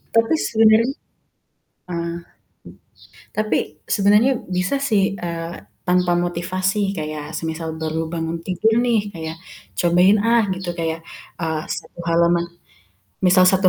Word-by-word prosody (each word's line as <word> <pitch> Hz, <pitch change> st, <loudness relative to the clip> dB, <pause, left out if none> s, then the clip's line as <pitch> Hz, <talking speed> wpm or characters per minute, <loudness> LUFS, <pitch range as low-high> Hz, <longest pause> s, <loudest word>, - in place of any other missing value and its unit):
Tapi 230 Hz, +5 st, +4 dB
sebenarnya 220 Hz, 0 st, +5 dB, 1.1 s
ah, 170 Hz, -1 st, -3 dB, 1.2 s
tapi 215 Hz, 0 st, +1 dB, 0.4 s
sebenarnya 210 Hz, +6 st, +4 dB, 0.2 s
bisa 180 Hz, +9 st, +1 dB
sih, 200 Hz, -2 st, +2 dB
eee, 170 Hz, -1 st, -4 dB, 0.3 s
tanpa 180 Hz, 0 st, +3 dB
motivasi 185 Hz, +3 st, 0 dB
kayak 155 Hz, 0 st, -5 dB
semisal 160 Hz, 0 st, -4 dB
baru 160 Hz, +1 st, -1 dB
bangun 165 Hz, 0 st, -2 dB
tidur 220 Hz, +5 st, +2 dB
nih, 225 Hz, -4 st, +1 dB
kayak, 160 Hz, -1 st, -6 dB, 0.4 s
cobain, 180 Hz, +4 st, +5 dB
ah, 230 Hz, +1 st, +4 dB
gitu 185 Hz, -1 st, -5 dB
kayak, 165 Hz, 0 st, -2 dB, 0.4 s
eee, 160 Hz, -1 st, -1 dB
1 -, -, -6 dB
halaman 170 Hz, +1 st, +3 dB, 0.8 s
misal, 185 Hz, 0 st, +6 dB
1 190 Hz, 0 st, +5 dB
180 Hz, 115 wpm, -21 LUFS, 165-205 Hz, 1.2 s, misal